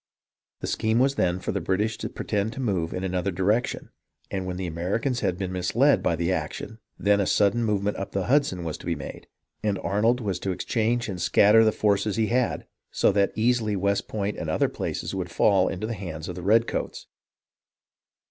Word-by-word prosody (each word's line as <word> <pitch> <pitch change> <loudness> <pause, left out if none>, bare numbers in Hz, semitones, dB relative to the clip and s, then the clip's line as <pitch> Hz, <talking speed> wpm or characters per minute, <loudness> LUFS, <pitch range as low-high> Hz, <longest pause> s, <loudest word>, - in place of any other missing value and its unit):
The - - -3
scheme 110 +1 0
then 125 -9 +2
was 90 - -9
for - - 0
the 100 - -2
British 100 +6 0
to - - -4
pretend 105 +1 -2
to - - -8
move 95 -10 -1
in 90 - -4
another 90 0 -1
direction, 100 +6 0 0.4
and 95 -2 -3
when 90 0 -4
the 95 - -3
Americans 95 - -1
had 95 -5 -1
been 95 -1 -3
misled 115 +10 +2
by 85 - +1
the 85 +2 -1
action, 110 +4 -4 0.2
then 100 0 +3
a 95 - 0
sudden 105 +3 +3
movement 105 -2 0
up 95 - -5
the 95 - -1
Hudson 130 -10 +2
was 80 -2 -4
to - - -10
be 85 - 0
made, 70 - -8 0.3
and 105 -2 0
Arnold 110 +7 +1
was 100 -6 -2
to 95 - -3
exchange 115 +5 0
and 95 -4 -5
scatter 105 +5 +5
the 110 - +4
forces 105 -1 +1
he 110 -1 +1
had, 125 0 0 0.2
so - - +2
that 100 0 +2
easily 110 -2 +1
West 100 +1 0
Point 105 -1 -3
and - - -4
other - - +1
places - - -4
would 90 -2 -3
fall 95 +1 +3
into 95 +4 -3
the 115 - -3
hands 85 -6 -6
of 90 - -4
the 90 - -7
redcoats. 110 +5 +1
100 Hz, 205 wpm, -25 LUFS, 90-110 Hz, 0.4 s, scatter